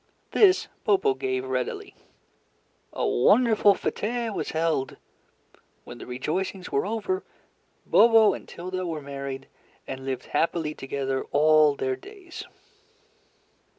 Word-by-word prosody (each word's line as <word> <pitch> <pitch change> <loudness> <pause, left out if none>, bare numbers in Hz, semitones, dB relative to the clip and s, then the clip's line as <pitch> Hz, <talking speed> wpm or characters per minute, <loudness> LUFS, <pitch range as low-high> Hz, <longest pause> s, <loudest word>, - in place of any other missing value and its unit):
This 385 -3 +4 0.2
Bobo 410 -1 +3
gave 390 0 -2
readily. 410 0 -3 1.0
A - - -1
wonderful 220 -5 +4
fete 230 +3 -2
was - - -3
held. 160 -4 -1 0.9
When 120 - -11
the - - -9
rejoicings 180 +9 -3
were 140 - 0
over, 225 - -2 0.6
Bobo 225 -2 +6
and - - -8
Tilda 185 +1 -5
were 160 -3 -4
married, 140 -1 -6 0.4
and 135 0 -7
lived 130 -1 -4
happily 160 -2 0
together 135 -1 -3
all 155 0 +4
their 130 -1 -1
days. 380 - -11
185 Hz, 115 wpm, -26 LUFS, -, 1.0 s, Bobo